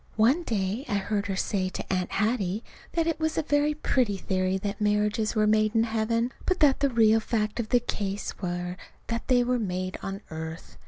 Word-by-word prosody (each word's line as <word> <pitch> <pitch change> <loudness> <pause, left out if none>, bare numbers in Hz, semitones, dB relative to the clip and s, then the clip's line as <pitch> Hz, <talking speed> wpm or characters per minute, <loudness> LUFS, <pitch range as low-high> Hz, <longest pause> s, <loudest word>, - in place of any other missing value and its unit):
One 245 +10 +4
day 215 - -1
I 205 - +1
heard 200 +1 -1
her 195 - -2
say 185 0 0
to 190 - -4
Aunt 185 -1 -1
Hattie 210 -1 0 0.3
that 330 -1 +1
it 325 -2 -1
was 315 0 -1
a 320 - +2
very 295 +1 +2
pretty 245 -8 +1
theory 185 0 0
that 200 +2 -4
marriages 210 +1 +1
were 215 -1 +3
made 215 +1 +3
in 225 - +5
heaven, 230 +2 0 0.2
but 370 - +2
that 285 -3 +5
the 280 0 +3
real 225 -2 +5
facts 215 0 -1
of 220 -2 -2
the 245 - +5
case 205 -5 -4
were 180 0 -3 0.3
that 230 0 -3
they 245 -2 +4
were 250 0 +1
made 185 -3 -3
on 195 +1 -5
earth. 160 +1 -7
215 Hz, 205 wpm, -27 LUFS, 195-240 Hz, 0.3 s, in